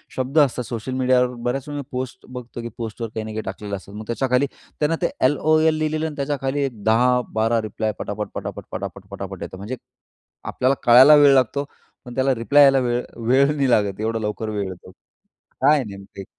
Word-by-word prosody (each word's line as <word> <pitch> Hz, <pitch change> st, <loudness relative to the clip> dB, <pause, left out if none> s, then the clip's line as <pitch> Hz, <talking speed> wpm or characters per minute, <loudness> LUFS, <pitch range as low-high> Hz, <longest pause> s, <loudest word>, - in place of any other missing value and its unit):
शब्द 130 Hz, +4 st, -3 dB
असतात 130 Hz, -4 st, +2 dB
सोशल 120 Hz, +2 st, -5 dB
मीडियावर, 125 Hz, -1 st, +2 dB
बऱ्याच 125 Hz, +3 st, -3 dB
वेळी 145 Hz, 0 st, -5 dB
मी -, -, -5 dB
पोस्ट 130 Hz, -1 st, -5 dB
बघतो 125 Hz, -1 st, -8 dB
की 120 Hz, -, -6 dB
पोस्टवर 115 Hz, 0 st, -5 dB
काही 110 Hz, -, -2 dB
ना 110 Hz, -, -6 dB
काही 110 Hz, 0 st, -3 dB
टाकलेलं 105 Hz, -1 st, -5 dB
असतात. 100 Hz, +1 st, -11 dB
मग 110 Hz, -, -7 dB
त्याच्याखाली 125 Hz, +4 st, +1 dB, 0.3 s
त्यांना 155 Hz, +2 st, +1 dB
ते -, -, +1 dB, 0.2 s
एल-ओ-एल 155 Hz, +3 st, +3 dB
लिहिलेलं 155 Hz, 0 st, -1 dB
आणि 155 Hz, -, -7 dB
त्याच्याखाली 140 Hz, -1 st, -2 dB
एक 115 Hz, -6 st, -7 dB
10-12 115 Hz, 0 st, +2 dB
रिप्लाय 110 Hz, 0 st, -3 dB
पटापट, 105 Hz, +1 st, -4 dB
पटापट, -, -, -6 dB
पटापट, -, -, -6 dB
पटापट -, -, -7 dB
येतो. -, -, -7 dB
म्हणजे 105 Hz, +7 st, -5 dB, 0.7 s
आपल्याला 130 Hz, +2 st, 0 dB
कळायला 130 Hz, +5 st, +8 dB
वेळ 145 Hz, -1 st, +7 dB
लागतो 135 Hz, +2 st, +2 dB, 0.4 s
पण 125 Hz, -1 st, -9 dB
त्याला 135 Hz, 0 st, +2 dB
रिप्लाय 140 Hz, +5 st, +5 dB
यायला 135 Hz, -1 st, +6 dB
वेळ 120 Hz, -1 st, 0 dB, 0.3 s
वेळ 140 Hz, +4 st, +4 dB
नाही 140 Hz, -3 st, +1 dB
लागत, 105 Hz, -5 st, +1 dB
एवढं 115 Hz, +1 st, -1 dB
लवकर 105 Hz, +1 st, -3 dB
वेळ 105 Hz, -2 st, -2 dB
येतो. 90 Hz, 0 st, -11 dB, 0.7 s
काय 145 Hz, +3 st, +6 dB
आहे 135 Hz, -, -1 dB
नेमकं 100 Hz, -1 st, -10 dB
हे? -, -, -7 dB
125 Hz, 195 wpm, -22 LUFS, 110-140 Hz, 0.7 s, कळायला